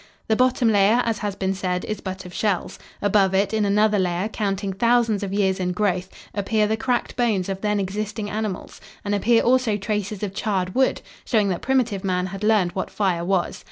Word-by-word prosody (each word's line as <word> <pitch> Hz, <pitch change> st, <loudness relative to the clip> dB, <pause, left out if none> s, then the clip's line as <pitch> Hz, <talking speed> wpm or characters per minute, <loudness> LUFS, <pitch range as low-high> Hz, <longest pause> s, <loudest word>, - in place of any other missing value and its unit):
The 220 Hz, -, +4 dB
bottom 255 Hz, 0 st, +2 dB
layer, 215 Hz, +3 st, +4 dB
as 225 Hz, -2 st, -1 dB
has 205 Hz, -2 st, -3 dB
been 190 Hz, 0 st, -1 dB
said, 180 Hz, -1 st, -2 dB
is 215 Hz, -, -4 dB
but 190 Hz, 0 st, -6 dB
of 180 Hz, -, -10 dB
shells. 200 Hz, -3 st, -1 dB, 0.2 s
Above 195 Hz, -2 st, +3 dB
it, 195 Hz, +2 st, +1 dB
in 215 Hz, -1 st, +2 dB
another 210 Hz, +1 st, +3 dB
layer, 180 Hz, +2 st, 0 dB
counting 200 Hz, -2 st, -2 dB
thousands 230 Hz, 0 st, +2 dB
of 200 Hz, -2 st, -3 dB
years 195 Hz, -2 st, +1 dB
in 180 Hz, -1 st, -1 dB
growth, 185 Hz, -2 st, 0 dB, 0.2 s
appear 210 Hz, +1 st, +1 dB
the 215 Hz, +1 st, +1 dB
cracked 245 Hz, +2 st, -1 dB
bones 215 Hz, -7 st, 0 dB
of 195 Hz, 0 st, -4 dB
then 210 Hz, -1 st, +1 dB
existing 205 Hz, +2 st, -3 dB
animals 210 Hz, -2 st, -4 dB, 0.2 s
and 205 Hz, -, -1 dB
appear 225 Hz, +3 st, +3 dB
also 245 Hz, -3 st, +2 dB
traces 210 Hz, 0 st, -3 dB
of 200 Hz, -2 st, -3 dB
charred 195 Hz, -4 st, -1 dB
wood, 260 Hz, 0 st, +1 dB, 0.2 s
showing 215 Hz, -4 st, +1 dB
that 180 Hz, -, -2 dB
primitive 245 Hz, -7 st, 0 dB
man 180 Hz, -2 st, 0 dB
had 195 Hz, +2 st, -6 dB
learned 210 Hz, -5 st, +3 dB
what 185 Hz, -, -3 dB
fire 185 Hz, -5 st, 0 dB
was. 185 Hz, -1 st, 0 dB
205 Hz, 200 wpm, -23 LUFS, 190-220 Hz, 0.2 s, The